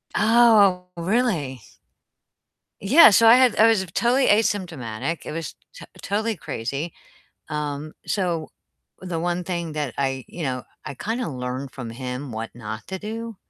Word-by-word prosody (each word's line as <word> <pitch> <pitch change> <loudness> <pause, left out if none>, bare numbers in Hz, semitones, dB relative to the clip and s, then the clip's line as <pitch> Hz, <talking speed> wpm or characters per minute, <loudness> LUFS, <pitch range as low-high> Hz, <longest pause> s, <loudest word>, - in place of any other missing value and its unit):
Oh, 210 -5 +5
really? 170 - -1 1.2
Yeah. 265 - +8
so 225 +3 +5
I 230 - +9
had 255 -2 +4
I 225 - +7
was 215 -4 +2
totally 255 +3 +2
asymptomatic, 170 - -1
it - - -5
was 165 0 -5 0.2
t - - -10 0.2
totally 220 +2 -1
crazy. 140 +7 -4 0.6
Um, 150 0 -4
so, 175 -5 -1 0.5
the 180 -3 -4
one 175 +1 -2
thing 170 -2 -3
that 150 -4 -3
I 135 -2 -2
you 170 - -7
know, 130 -3 -2 0.2
I - - -6
kinda 225 - -3
learned 130 0 -5
from 125 -3 -7
him 125 +2 -6
what 110 +1 -5
not 110 -1 -7
to 190 - -4
do 225 +1 -6
170 Hz, 145 wpm, -23 LUFS, 135-215 Hz, 1.2 s, I